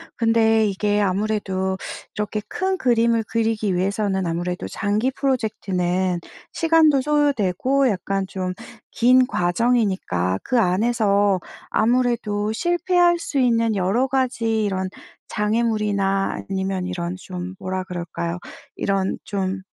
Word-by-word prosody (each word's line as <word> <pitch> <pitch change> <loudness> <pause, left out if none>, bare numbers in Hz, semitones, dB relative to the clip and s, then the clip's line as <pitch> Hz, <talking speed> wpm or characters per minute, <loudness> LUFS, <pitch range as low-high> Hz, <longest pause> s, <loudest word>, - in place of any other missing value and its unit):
근데 225 -1 +3
이게 205 +1 0
아무래도 190 -1 -1 0.4
이렇게 210 0 -2
큰 380 - -1
그림을 230 -2 +2
그리기 220 -4 0
위해서는 190 +1 0
아무래도 175 +2 -3
장기 215 +5 0
프로젝트는 190 -9 -1 0.3
시간도 320 -4 +4
소요되고 275 -3 +2
약간 195 -1 -1
좀 185 -1 -3 0.4
긴 255 +2 +4
과정이니까 180 - 0
그 250 - +1
안에서 205 -1 +2 0.3
아무래도 225 -3 +1
실패할 350 +5 +2
수 290 - -4
있는 230 -3 +2
여러 200 +7 +1
가지 235 -4 0
이런 190 -2 -2 0.4
장애물이나 210 -3 0
아니면 190 -1 -2
이런 175 -1 -3
좀 185 0 -7
뭐라 185 0 -3
그럴까요. 170 -1 -4 0.4
이런 195 -1 -1
좀 190 -1 -3
210 Hz, 270 characters per minute, -22 LUFS, 190-235 Hz, 0.4 s, 시간도